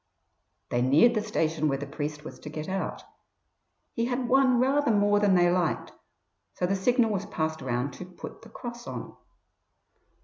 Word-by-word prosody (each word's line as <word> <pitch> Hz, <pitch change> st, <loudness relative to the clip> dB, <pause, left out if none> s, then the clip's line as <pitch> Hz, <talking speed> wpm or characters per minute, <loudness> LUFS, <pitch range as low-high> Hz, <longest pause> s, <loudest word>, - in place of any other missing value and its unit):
They 120 Hz, -, +1 dB
neared 145 Hz, -, +5 dB
the 215 Hz, -, +1 dB
station 160 Hz, -7 st, 0 dB
where 135 Hz, -2 st, +1 dB
the 145 Hz, -, -5 dB
priest 150 Hz, +1 st, -5 dB
was -, -, -9 dB
to -, -, -8 dB
get 155 Hz, 0 st, -6 dB
out. 190 Hz, 0 st, -3 dB, 0.9 s
He 230 Hz, -, 0 dB
had 245 Hz, 0 st, -1 dB
won 260 Hz, 0 st, +4 dB
rather 275 Hz, +2 st, +2 dB
more 205 Hz, -1 st, +4 dB
than 205 Hz, -2 st, +4 dB
they 175 Hz, -1 st, +4 dB
liked, 175 Hz, -2 st, 0 dB, 0.6 s
so -, -, 0 dB
the 195 Hz, +2 st, +1 dB
signal 230 Hz, +3 st, +2 dB
was 200 Hz, 0 st, -2 dB
passed 160 Hz, -5 st, -2 dB
round 125 Hz, +1 st, -2 dB
to 180 Hz, -, -8 dB
"put 180 Hz, -1 st, -10 dB
the 225 Hz, -, -14 dB
cross 240 Hz, +1 st, -8 dB
on". -, -, -6 dB
190 Hz, 175 wpm, -27 LUFS, 155-235 Hz, 0.9 s, neared